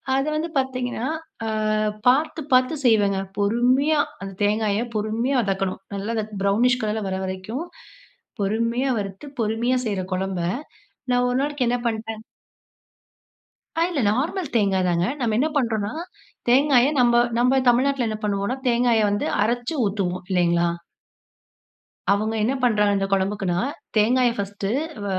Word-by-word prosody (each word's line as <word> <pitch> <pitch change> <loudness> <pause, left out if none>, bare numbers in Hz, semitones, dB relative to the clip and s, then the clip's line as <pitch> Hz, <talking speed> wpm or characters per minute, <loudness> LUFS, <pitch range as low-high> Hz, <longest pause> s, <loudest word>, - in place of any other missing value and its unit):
அது 270 +2 0
வந்து 320 +2 -2
பாத்தீங்கன்னா, 255 -2 -2 0.4
அ - - -1 0.6
பாத்து, 300 +5 +3
பாத்து 255 +4 +4
செய்வேங்க. 205 -4 +3 0.2
பொறுமையா 250 +8 +2 0.2
அந்த 195 0 -6
தேங்காய 210 +1 +1
பொறுமையா 225 +6 0
வதக்கணும். 195 -1 -2
நல்லா 200 +3 -3 0.3
ப்ரௌனிஷ் 240 +6 +3
கலர்ல 215 0 -1
வர 190 - -2
வரைக்கும் 190 - -5 0.8
பொறுமையா 230 +6 0
வறுத்து 195 +5 -6 0.2
பொறுமையா 225 +4 +1
செய்யற 200 -3 -1
குழம்ப 190 -1 -2 0.7
நான் 245 0 +3
ஒரு 245 - 0
நாளைக்கு 290 -2 -1
என்ன 245 - +1
பண்ட்டேன் 225 -1 -4 1.6
ஆ, - - +2
இல்ல 320 -6 -1
நார்மல் 300 - -1
தேங்காய் 195 -4 +2
தாங்க. 175 0 +1
நம்ம 230 -4 0
என்ன 280 +6 +2
பண்ணுறோம்னா 220 -5 0 0.6
தேங்காய 265 0 +5
நம்ம 240 -1 +5 0.2
நம்ம 255 +2 +4
தமிழ்நாட்டில 255 0 +2
என்ன 215 -1 -3
பண்ணுவோம்னா, 200 +4 -1
தேங்காய 235 -2 +3
வந்து 205 0 -1 0.2
அரச்சு 240 +6 -1
ஊத்துவோம், 190 -3 -2
இல்லைங்களா? 170 -2 +2 1.4
அவங்க 215 +2 +1
என்ன 240 +5 +1
பண்றாங்க? 210 -4 +3
இந்த 195 - 0
குழம்புக்குன்னா, 195 -2 0 0.4
தேங்காய 245 +4 +4
பர்ஸ்ட் 200 0 -4 0.4
வ - - -4
225 Hz, 130 wpm, -23 LUFS, 200-250 Hz, 1.6 s, தேங்காய